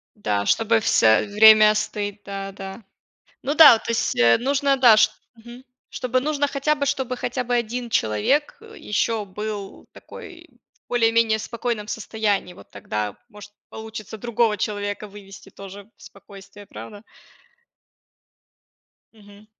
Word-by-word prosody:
Да, 105 - -2
чтобы 225 0 +2
всё 110 - +3
время 215 +1 +7
остыть, 205 -1 -4
да, 195 0 -7
да. 195 +2 -10 0.6
Ну 280 - -1
да, 310 -4 +9
вот 225 - -2
то - - -3
есть, 230 - -1
э, 115 -1 +5
нужно, 275 +2 0
да, 240 -4 +6
ш - - +4 0.2
мгм, 240 +2 -14 0.3
чтобы 255 0 -2
нужно 290 0 -1
хотя 280 +2 -1
бы, 285 -1 -2
чтобы 265 -2 -2
хотя 250 +1 -3
бы 245 - -3
1 240 +1 -3
человек, 110 - 0
э, 445 0 -14
ещё 210 +1 -2
был 205 0 -7
такой - - -13 0.4
в - - -
более-менее 230 -2 +2
спокойном 230 -1 -4
состоянии. 210 -4 -3
Вот - - -17
тогда 105 -1 -5
может 210 -1 -14 0.2
получится 220 -1 -9
другого 230 -1 0
человека 205 +1 -4
вывести 195 -1 -14
тоже 195 +1 -12
в - - -25
спокойствие, 200 0 -15
правда? 205 +1 -11 2.1
Мгм. 205 -1 -18
215 Hz, 140 wpm, -22 LUFS, 200-240 Hz, 2.1 s, да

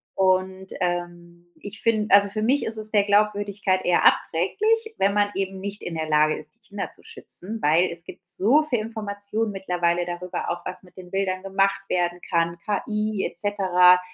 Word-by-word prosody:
Und, 190 0 0
ähm, 175 -1 -4
ich 205 +1 -2
find 220 -2 +2
also, 200 0 +7
für 215 +2 -3
mich 260 +6 +2
ist 225 0 -4
es 215 0 0
der 205 -2 +4
Glaubwürdigkeit 205 -2 +1
eher 175 - +3
abträglich, 440 - +2
wenn 200 +1 +2
man 205 0 +2
eben 195 0 -3
nicht 200 +2 -6
in 170 - -5
der 160 -1 -3
Lage 155 0 +3
ist, 155 - -8
die - - -43
Kinder 200 -1 -5
zu - - -11
schützen, 225 - -8
weil 165 +5 +3
es 170 0 -5
gibt 180 - -12
so 210 - +3
viele 255 -7 +1
Informationen 215 0 -3
mittlerweile 175 -3 0
darüber, 175 +1 -4
auch 175 0 -4
was 185 +1 -6
mit 180 -1 -20
den 180 -1 -11
Bildern 190 -1 -1
gemacht 195 0 +1
werden 175 0 0
kann, 170 0 +1
KI, 210 0 -1
et 170 - -4
cetera, 180 -2 +4
195 Hz, 185 wpm, -24 LUFS, 175-210 Hz, -, also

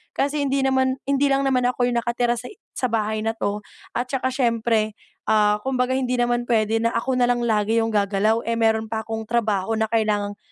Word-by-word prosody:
kasi 285 +2 0
hindi 275 0 +1
naman 260 -1 +2
hindi 280 +1 +3
lang 275 0 +2
naman 255 -2 +1
ako 245 0 +1
yung 240 - 0
nakatira 240 0 0
sa 250 - -8 0.3
sa 255 - 0
bahay 215 -1 0
na 225 - 0
‘to, 205 -1 -2 0.4
at 245 - -1
tsaka 260 -1 -1
syempre, 230 -4 +1 0.3
ah, 210 -1 +3
kumbaga 255 -1 0
hindi 255 -1 -1
naman 240 0 0
pwede 225 -1 +2
na 230 - +2
ako 255 +2 0
nalang 245 0 +2
lagi 220 0 +1
yung 225 - -1
gagalaw 210 +2 +1
eh 230 0 0
meron 220 0 +2
pa 220 0 -1
akong 225 0 -5
trabaho 225 -3 0
na 220 - 0
kailangang 210 -2 0
230 Hz, 200 wpm, -23 LUFS, 220-250 Hz, 0.4 s, hindi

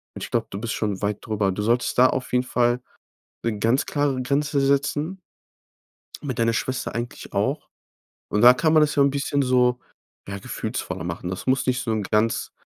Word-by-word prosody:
Und - - -6
ich - - -7
glaube, - - 0
du 100 - -6
bist 115 0 -3
schon 105 -3 -2
weit 105 0 -1
darüber. 105 -3 0
Du 105 - -3
solltest 120 +4 +1
da 130 +1 +7
auf 130 -1 -3
jeden 125 0 +3
Fall 120 0 +1 0.6
'ne 110 -3 -1
ganz 115 +7 +2
klare 145 -3 0
Grenze 145 +2 0
setzen, 145 +6 0 1.0
mit 130 -4 -4
deiner 115 0 +2
Schwester 130 +1 -2
eigentlich 120 +1 -6
auch. - - -1 0.6
Und 105 - 0
da 125 - +10
kann 155 +3 +2
man 155 - +6
das 150 - +2
ja 140 - +5
'n 140 - +4
bisschen 140 0 -1
so, 125 -1 +3 0.5
ja, 100 0 -4
gefühlsvoller 85 - -4
machen. 85 +1 -4
Das 95 - -6
muss 130 +1 +2
nicht 125 +1 +1
so 115 - -2
’ne 110 - -1
ganz 110 +1 +1
125 Hz, 200 wpm, -24 LUFS, 110-140 Hz, 1.0 s, da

